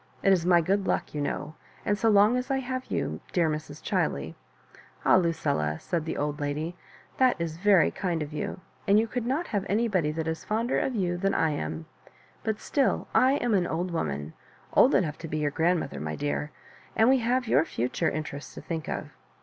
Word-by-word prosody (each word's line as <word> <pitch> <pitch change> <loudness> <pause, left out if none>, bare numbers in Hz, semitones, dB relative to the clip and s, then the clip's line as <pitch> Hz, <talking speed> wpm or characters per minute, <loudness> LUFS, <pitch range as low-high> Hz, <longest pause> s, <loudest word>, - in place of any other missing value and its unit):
It 195 - +6
is 175 -2 +1
my 175 -1 +6
good 195 +3 0
luck, - - -1
you 150 - -2
know; 145 - -3 0.3
and 205 - +2
so 225 +2 +2
long 210 +3 +5
as 250 0 -2
I 270 - +2
have 255 0 -3
you, - - -2
dear 175 -4 +3
Mr& 155 -1 -5
Chiley 70 -1 -1
^" - - -27 0.7
"Ah, - - +6
Lucilla 150 - 0
1" 80 - -9
said 165 -3 -2
the 160 - -3
old 145 +1 -2
lady, 150 +4 -2 0.4
that 255 -1 +4
is 165 -1 -3
very 195 0 +4
kind 175 -5 -2
of 150 0 -8
you— 155 +4 -4 0.3
and 200 +1 +6
you 220 - +4
could 235 +1 -3
not 290 +7 0
have 205 -3 0
anybody 200 -8 +1
that 160 +1 -3
is 160 0 -3
fonder 225 +4 0
of 260 - -1
you 175 -4 0
than 195 +2 0
I 160 -1 +2
am; 80 - -4 0.6
but 220 -1 -1
still 275 -3 0
I 260 +1 +5
am 245 -5 +1
an 185 -3 +2
old 175 +3 -2
woman, 75 - -3 0.4
old 265 - +6
enough 155 -6 +1
to 165 - -6
be 155 - -3
your 150 -1 0
grand 170 +4 +2
mother, 140 - -5
my 75 0 -3
dear 145 0 -2 0.2
— - - -25
and 220 - +4
we 265 0 +5
have 245 +1 0
your 150 -7 +4
future 125 -5 -1
in 155 - -2
terests 145 -1 -8
to - - -7
think 160 -2 -4
of. - - -4
175 Hz, 220 wpm, -27 LUFS, 150-220 Hz, 0.7 s, It